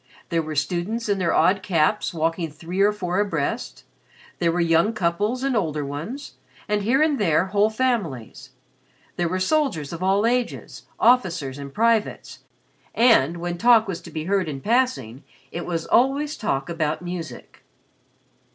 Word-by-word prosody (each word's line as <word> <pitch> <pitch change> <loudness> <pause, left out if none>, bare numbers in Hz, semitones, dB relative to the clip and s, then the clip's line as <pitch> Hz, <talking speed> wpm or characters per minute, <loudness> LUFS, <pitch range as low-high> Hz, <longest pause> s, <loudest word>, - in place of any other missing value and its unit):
There 165 -2 +1
were 155 -1 -6
students 185 +10 -2
in 200 -1 0
their 170 -3 +1
odd 195 +1 +3
caps 190 +1 +1
walking 165 0 -1
three 165 +6 -4
or 205 +1 +5
four 185 -3 -2
abreast, 175 -9 -2 0.6
there 170 -1 +2
were 175 - -1
young 170 +5 +3
couples 210 +6 -1
and 270 -2 0
older 155 -8 -1
ones, 160 - -7 0.3
and 210 -1 0
here 255 +8 +3
and 300 -3 +1
there 170 -3 +2
whole 205 +1 +4
families; 215 - -2 0.7
there 175 -1 -1
were 185 +2 -1
soldiers 185 - 0
of 170 - -7
all 195 +3 +2
ages, 245 +1 -2
officers 175 - +2
and 140 -1 -7
privates; 225 +3 0 0.6
and, 175 - +4
when 175 0 -4
talk 230 -1 +5
was 185 -4 -4
to - - -11
be 155 - -5
heard 190 -1 0
in 140 -2 -5
passing, 145 - 0 0.3
it 175 - -5
was 165 -2 -2
always 280 +4 +2
talk 145 - -2
about 160 -1 -2
music. 175 -2 -7
185 Hz, 160 wpm, -23 LUFS, 165-225 Hz, 0.7 s, or